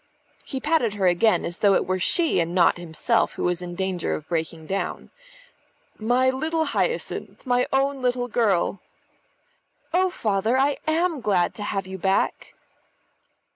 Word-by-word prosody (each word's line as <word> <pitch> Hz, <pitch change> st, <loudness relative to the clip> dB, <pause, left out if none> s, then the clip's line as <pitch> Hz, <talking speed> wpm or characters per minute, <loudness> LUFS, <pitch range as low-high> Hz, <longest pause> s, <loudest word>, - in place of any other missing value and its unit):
He 265 Hz, -, -5 dB
patted 295 Hz, -7 st, +1 dB
her 195 Hz, -2 st, 0 dB
again, 180 Hz, +5 st, +3 dB
as 175 Hz, -, -5 dB
though 200 Hz, -2 st, +4 dB
it -, -, +1 dB
were 185 Hz, 0 st, -1 dB
she 330 Hz, -, +3 dB
and 170 Hz, +1 st, -1 dB
not 175 Hz, -1 st, +4 dB
himself 175 Hz, +7 st, 0 dB
who -, -, -5 dB
was 180 Hz, 0 st, 0 dB
in 175 Hz, 0 st, -6 dB
danger 190 Hz, -2 st, -2 dB
of 155 Hz, -, -8 dB
breaking 160 Hz, -1 st, -3 dB
down. 195 Hz, +4 st, -4 dB, 0.9 s
"My 245 Hz, +4 st, +2 dB
little 315 Hz, +4 st, -1 dB
Hyacinth! 480 Hz, -6 st, -3 dB
My 250 Hz, -1 st, +1 dB
own 275 Hz, 0 st, +1 dB
little 245 Hz, -1 st, 0 dB
girl!" 205 Hz, -5 st, +1 dB, 1.1 s
"Oh, 370 Hz, +1 st, +3 dB
Father, 220 Hz, -, 0 dB
I 275 Hz, +1 st, +2 dB
am 325 Hz, -2 st, +1 dB
glad 195 Hz, -6 st, +1 dB
to -, -, -8 dB
have 200 Hz, -1 st, -2 dB
you 190 Hz, 0 st, -7 dB
back." 190 Hz, +2 st, -1 dB
215 Hz, 155 wpm, -24 LUFS, 180-265 Hz, 1.1 s, though